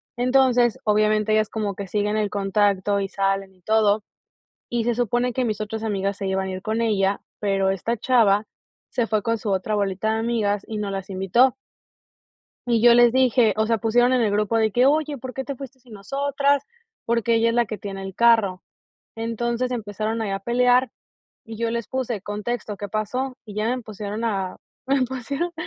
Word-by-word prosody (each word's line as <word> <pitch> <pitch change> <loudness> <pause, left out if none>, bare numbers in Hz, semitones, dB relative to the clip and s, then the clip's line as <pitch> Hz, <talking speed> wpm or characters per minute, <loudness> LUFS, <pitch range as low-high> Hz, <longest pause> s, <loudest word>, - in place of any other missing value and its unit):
Entonces, 250 -2 +3
obviamente 215 0 +2
ellas 215 0 +2
como 210 -3 -2
que 200 +1 -7
siguen 210 +2 0
en 210 -1 0
contacto 200 0 +1
y 195 - -1
salen 195 -1 -1
y 185 - -29
todo, 215 0 +2 0.7
y 235 -1 0
se 240 0 +1
supone 245 +1 0
que 255 - 0
mis 215 -3 -2
otras 215 +1 -4
amigas 200 -2 -1
se 195 - -4
iban 190 0 -1
a - - -4
ir 185 0 -6
con 220 +3 -1
ella, 200 -3 +1 0.2
pero 195 -2 +1
esta 195 +5 -1
chava 215 -4 +3 0.4
se 240 - -1
fue 215 -2 0
con 230 +2 0
su 210 -1 -4
otra 195 +2 0
bolita 200 +1 0
de - - -1
amigas 215 -3 0
y 220 - -5
no 205 -1 -3
las 195 0 -5
invitó. 195 +7 +3 1.1
Y 230 -2 +2
yo 240 0 +7
les 240 0 +6
dije, 250 -3 +3
o 220 0 +1
sea, 230 0 +2
pusieron 240 +4 +3
en 255 - +3
el 215 -3 +1
grupo 210 +2 +1
de 220 -1 +2
que: 245 +4 +3
"Oye, 300 +1 +2
¿por 255 0 -8
qué 265 - -4
te 275 +2 -5
fuiste 270 0 -10
sin 245 -3 -16
nosotras?" 280 +7 0 0.4
Porque 235 0 +1
ella 230 +1 +3
es 230 - -1
la 240 0 +3
que 215 0 -6
tiene 195 -1 -6
el 190 -1 -7
carro. 225 -6 +3 0.5
Entonces 235 +2 -2
empezaron 220 -1 -3
ahí 215 -3 -2
a 195 0 -2
pelear 245 +3 +3 0.5
y 225 -1 -9
yo 230 0 -1
les 235 -1 -3
puse: 255 -5 -2
"Contexto, 210 +2 -4
¿qué 205 +1 -6
pasó?" 250 +6 -3
Y 210 - -10
ya 210 +1 -1
me 240 - +1
empezaron 215 -2 -5
a 195 -5 -2 0.3
me 270 0 +2
pusieron 265 +7 -3
220 Hz, 200 wpm, -23 LUFS, 205-240 Hz, 1.1 s, yo